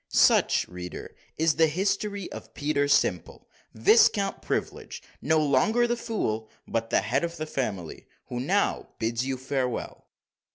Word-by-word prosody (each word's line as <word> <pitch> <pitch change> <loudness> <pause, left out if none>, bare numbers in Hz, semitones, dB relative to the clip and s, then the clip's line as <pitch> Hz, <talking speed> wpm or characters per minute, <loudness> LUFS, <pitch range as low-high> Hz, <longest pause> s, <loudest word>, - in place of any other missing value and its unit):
Such, - - +4
reader, 90 0 -8 0.2
is 160 0 +2
the 160 - +5
history 200 +3 -1
of - - -10
Peter 145 -1 0
Simple, 90 - 0 0.3
Viscount 195 - +4
Privilege, - - -4 0.2
no 160 +2 +2
longer 155 - +3
the 240 0 0
fool, 115 - -3 0.2
but 115 0 -2
the - - +3
head 110 - 0
of 170 0 -3
the 155 - -3
family, 105 - -4 0.2
who 120 - -5
now 190 +11 0
bids 115 +2 -1
you 135 -1 -2
farewell. 130 -1 -3
145 Hz, 140 wpm, -27 LUFS, 115-185 Hz, 0.3 s, the